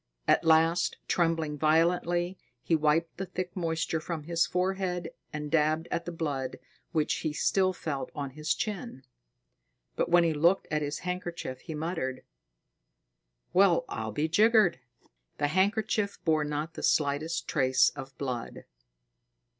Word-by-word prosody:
At - - +4
last, 165 +1 +3
trembling 165 -4 0
violently, 175 +3 +2 0.3
he 165 - +2
wiped 160 +2 +1
the 190 +1 -4
thick 185 0 -5
moisture 160 -2 -1
from 160 -1 -5
his 165 +1 +1
forehead 180 -2 -1 0.2
and 150 -1 -5
dabbed 155 +1 +2
at 170 - -2
the 175 - -4
blood 145 -6 -3 0.3
which 155 -3 +1
he 155 -2 -2
still 185 +4 +2
felt 155 -6 -4
on 140 -2 -4
his 155 +3 -1
chin. 210 - -4 0.9
But - - 0
when 175 0 +6
he 165 -1 +2
looked 170 +6 +3
at 150 0 +1
his 145 0 -2
handkerchief, 175 -7 -4
he 160 - -7
muttered: 150 -5 -3 1.3
"Well, 185 -2 +4
I'll 110 0 -4
be 150 +9 0
jiggered!" 215 - +4 0.6
The 145 0 +1
handkerchief 205 +3 +1
bore 155 -2 +2
not 150 +2 -3
the - - -7
slightest 155 +3 +1
trace 130 -3 +3
of 135 -1 -9
blood. 125 -4 -5
165 Hz, 140 wpm, -29 LUFS, 150-175 Hz, 1.3 s, when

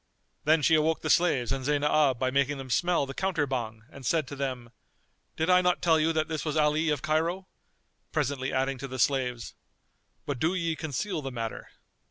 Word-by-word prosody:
Then 155 0 +4
she 160 - +4
awoke 155 0 +2
the 155 - +1
slaves 135 -9 +2
and 135 -1 -2
Zaynab 145 -1 +2
by 130 +1 0
making 140 +1 +1
them 130 -2 -7
smell 175 +1 +2
the 135 - -7
counter 185 -5 0
Bhang 115 -5 -4
and 140 - -12
said 155 +2 +1
to 145 - -6
them, 130 -4 -4 0.7
"Did 160 - 0
I 180 0 +5
not 180 0 +2
tell 160 -2 +3
you 160 +1 +2
that 155 -1 0
this 155 -2 -3
was 155 -1 -2
Ali 155 +1 +2
of 150 -4 -1
Cairo?"; 165 +5 0 0.7
presently 135 0 -1
adding 135 0 -1
to 135 - -5
the 130 0 -6
slaves, 125 -2 0 0.7
"But 140 -4 -3
do 165 +7 +1
ye 165 -3 -1
conceal 155 - -3
the 135 - -4
matter." 115 -2 -5
145 Hz, 200 wpm, -28 LUFS, 130-160 Hz, 0.7 s, I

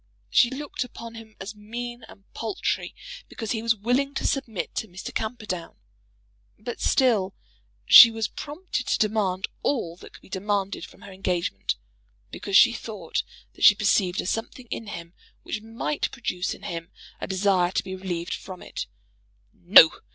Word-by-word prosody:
She 240 - +5
looked 275 +1 -4
upon 230 -2 -9
him 225 -1 -12
as 195 +3 -6
mean 240 +3 -7
and 195 - -15
paltry 220 -3 -2 0.3
because 225 -3 -5
he 225 - -1
was 230 0 +2
willing 250 +6 0
to - - -2
submit 230 -8 -2
to 220 - -3
Mr. 180 +1 -8
Camperdown. 215 -6 -4 0.8
But 235 +3 -7
still 215 -8 +2 0.5
she 235 - +11
was 225 -1 -2
prompted 295 -3 -5
to - - +2
demand 205 -3 0
all 180 -12 -1
that - - -14
could - - -14
be - - -16
demanded 200 0 -2
from - - -18
her 200 - -11
engagement, 180 - -2 0.6
because 195 -1 +1
she 235 - +7
thought 210 -7 -4 0.3
that - - -8
she 210 - +9
perceived 200 -3 +2
a - - -8
something 225 +5 -3
in 225 - -4
him 170 -2 -8 0.3
which 210 - -4
might 225 +6 -2
produce 185 -7 -3
in - - -17
him 165 0 -5 0.3
a - - -4
desire 190 -2 +2
to - - 0
be 190 -1 -6
relieved 180 -2 -4
from 185 -2 -8
it. - - -6 0.7
No! 175 -2 +8
210 Hz, 165 wpm, -25 LUFS, 185-230 Hz, 0.8 s, she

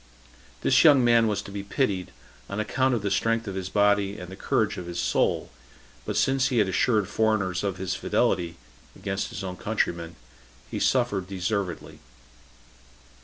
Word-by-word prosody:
This 130 - +4
young 145 -5 +7
man 115 -1 +5
was 105 -1 -1
to 100 - -10
be 100 0 -4
pitied, 100 -3 -1 0.4
on 100 - -4
account 130 +4 +1
of 110 - -3
the 100 - -1
strength 115 +3 +1
of 100 - -3
his 95 -1 -4
body 100 0 +2
and 90 +1 -9
the - - -7
courage - - 0
of 90 - -6
his 85 0 -4
soul; 85 - 0 0.5
but - - -2
since 135 -1 +2
he 125 - -1
had 105 -3 +4
assured 105 +1 +2
foreigners 100 -4 0
of 100 -2 -2
his 95 0 -2
fidelity 85 -2 0 0.4
[against 95 0 -3
his 100 - -6
own 90 -1 -5
countrymen], 85 -6 -2 0.6
he - - -3
suffered 120 -8 +1
deservedly. 95 -2 -3
100 Hz, 170 wpm, -26 LUFS, 95-110 Hz, 0.6 s, young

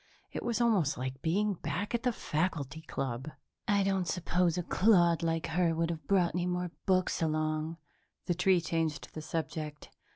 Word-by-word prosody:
It - - -4
was 235 -2 -1
almost 210 - +3
like 130 +1 -4
being 205 +6 +1
back 170 +5 -3
at 235 - +1
the 250 0 +2
faculty 155 - -2
club. 135 -3 -4 0.4
"I 200 -1 +3
don't 190 -2 +1
suppose 175 0 +1
a 180 - 0
clod 175 -4 +4
like 165 -1 0
her 165 0 +1
would 165 +1 0
have 160 -2 -7
brought 185 -4 +3
any 180 0 0
more 180 -1 -1 0.2
books 185 -2 +2
along," 155 0 0 0.5
the 175 - +1
tree 180 0 +3
changed 165 -2 -1
the 155 - -5
subject. 155 -1 -4
170 Hz, 170 wpm, -31 LUFS, 155-185 Hz, 0.5 s, clod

